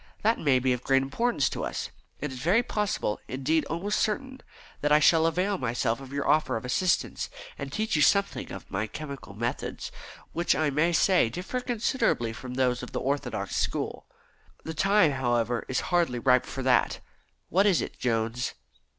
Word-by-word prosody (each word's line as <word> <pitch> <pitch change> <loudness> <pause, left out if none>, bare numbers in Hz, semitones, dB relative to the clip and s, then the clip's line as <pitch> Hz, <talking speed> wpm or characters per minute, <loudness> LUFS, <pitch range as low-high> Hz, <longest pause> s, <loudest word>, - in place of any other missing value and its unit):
"That 225 +2 +3
may 140 -4 +3
be 130 0 +2
of 125 - -3
great 135 0 +3
importance 145 - +1
to - - -4
us. - - -4 0.3
It 150 -1 -3
is 130 - -7
very 185 - +3
possible 210 - -1
indeed, 140 +5 0
almost 185 +6 -1
certain 260 +5 -2 0.4
that 145 - +1
I 150 - +8
shall 160 +2 +5
avail 185 +4 0
myself 120 -1 0
of 135 -1 -10
your 140 0 -2
offer 150 -5 +3
of 110 - -7
assistance, 170 +8 0 0.3
and 140 -1 -6
teach 215 +4 -1
you 150 - +3
something 200 +6 +2
of - - -9
my 110 - -1
chemical 140 -5 -8
methods, 120 +3 -3 0.4
which 170 -3 +2
I 150 +1 +1
may 155 +5 +2
say 175 -6 +4
differ 180 - -4
considerably 230 - 0
from 125 +2 -7
those 125 -1 +1
of 125 - -8
the - - -1
orthodox 140 +2 -2
school. - - -2 0.6
The 160 - -5
time, 195 -1 +4
however, 120 -3 0
is 130 - 0
hardly 170 -8 +2
ripe 125 +1 +3
for 135 - -5
that. 130 -1 +2 0.5
What 195 +5 +4
is 190 -5 +4
it, - - -5
Jones?" 115 0 -1
140 Hz, 180 wpm, -27 LUFS, 125-180 Hz, 0.6 s, I